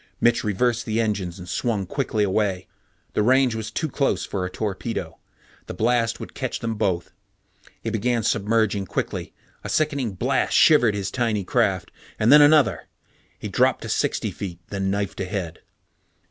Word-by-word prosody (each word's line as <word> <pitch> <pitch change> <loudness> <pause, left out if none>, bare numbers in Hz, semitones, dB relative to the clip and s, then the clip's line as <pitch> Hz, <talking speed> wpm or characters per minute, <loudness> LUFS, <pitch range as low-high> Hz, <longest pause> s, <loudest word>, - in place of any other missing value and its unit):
Mitch 120 0 +3
reversed 115 +3 0
the 110 +1 0
engines 100 -6 -1
and 90 -1 -10
swung 100 +4 -1
quickly 115 -1 -1
away. 95 -2 0 0.5
The - - +1
range 130 +2 +4
was 110 -1 -4
too 160 +8 -2
close 140 -1 0
for 95 -2 -3
a 90 - -2
torpedo. 110 +3 -4 0.5
The - - -6
blast 115 +2 +1
would - - -8
catch - - -3
them 115 0 -3
both. 90 -5 -1 0.7
He 115 - -2
began 115 +1 0
submerging 105 -2 +1
quickly. - - -3 0.3
A - - -5
sickening 140 -8 0
blast 90 - 0
shivered 120 -9 +5
his 100 -2 -3
tiny 115 -5 0
craft, - - 0 0.3
and 110 - +3
then 150 +1 +9
another. 145 -1 +4 0.5
He - - -6
dropped - - +2
to - - -6
sixty - - 0
feet, 90 -4 -7
then 95 -1 -2
knifed 100 0 -2
ahead. 90 -3 -4
110 Hz, 160 wpm, -23 LUFS, 95-120 Hz, 0.7 s, then